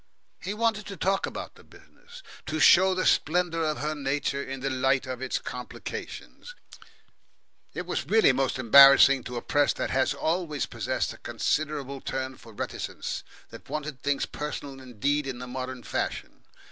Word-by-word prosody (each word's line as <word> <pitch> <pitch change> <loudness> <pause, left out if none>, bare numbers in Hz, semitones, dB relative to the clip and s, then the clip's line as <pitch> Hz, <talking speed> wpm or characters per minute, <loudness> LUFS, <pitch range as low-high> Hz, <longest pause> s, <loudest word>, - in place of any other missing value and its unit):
He 200 +4 -4
wanted 220 -2 0
to 195 - -7
talk 195 +3 0
about - - -7
the - - -18
business, 480 +1 -16 0.2
to 155 0 -2
show 185 +4 +6
the 185 - -1
splendour 165 0 +2
of 155 -1 -1
her 150 +1 -2
nature 140 -1 -2
in 135 -1 -6
the 135 0 -1
light 130 +1 +1
of 130 -1 -6
its 130 - -1
complications. 125 - -8 1.2
It - - -4
was - - -3
really 220 -9 +5
most 130 0 0
embarrassing 135 +1 +8
to 125 0 -5
a - - -5
press 145 -1 +2
that - - -3
has 130 0 +1
always 160 -4 -1
possessed - - -2
a - - -15
considerable 145 -3 -2
turn 130 0 -4
for 115 -1 -15
reticence, 105 - -5 0.3
that - - -12
wanted 150 -3 -5
things 140 -1 0
personal 145 -2 -6
indeed 135 +4 -1
in 130 -2 -4
the 125 - -7
modern 130 0 -6
fashion. - - -4
140 Hz, 165 wpm, -27 LUFS, 130-160 Hz, 1.2 s, embarrassing